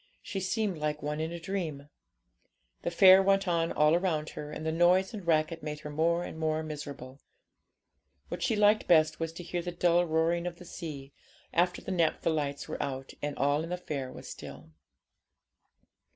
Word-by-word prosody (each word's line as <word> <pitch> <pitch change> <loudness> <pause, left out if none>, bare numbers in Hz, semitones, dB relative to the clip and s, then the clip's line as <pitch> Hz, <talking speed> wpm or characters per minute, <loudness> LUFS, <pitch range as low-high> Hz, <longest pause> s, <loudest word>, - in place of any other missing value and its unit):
She 195 - -4
seemed 190 -2 -1
like 150 -1 -2
one 150 +1 -2
in 160 +1 -2
a 170 - -5
dream. 165 -6 -4 0.9
The - - -1
fair 185 +2 +8
went 195 0 +2
on 165 -1 +1
all 150 +1 +4
around 165 -3 0
her, 150 0 -7
and 155 - -6
the 160 - +1
noise 180 +5 +3
and 200 -5 -7
racket 160 0 +1
made 150 0 -5
her 150 - -7
more 170 +3 +1
and 160 - -7
more 155 0 0
miserable. 140 -4 -7 1.1
What - - -6
she 225 - +1
liked 210 +1 +4
best 155 -2 +4
was 165 -1 -2
to 175 - -8
hear 175 +1 -3
the 175 +1 -4
dull 175 0 +2
roaring 165 +2 +1
of 175 - -5
the 180 - -13
sea, 145 -6 -8 0.4
after 175 +1 +1
the - - -5
naphtha 165 -2 +1
lights 145 -2 -2
were - - -4
out 135 -1 -4
and 145 0 -3
all 145 +3 +2
in 165 - -6
the 180 - -2
fair 140 -7 -5
was - - -10
still. - - -10
165 Hz, 190 wpm, -30 LUFS, 150-175 Hz, 1.1 s, fair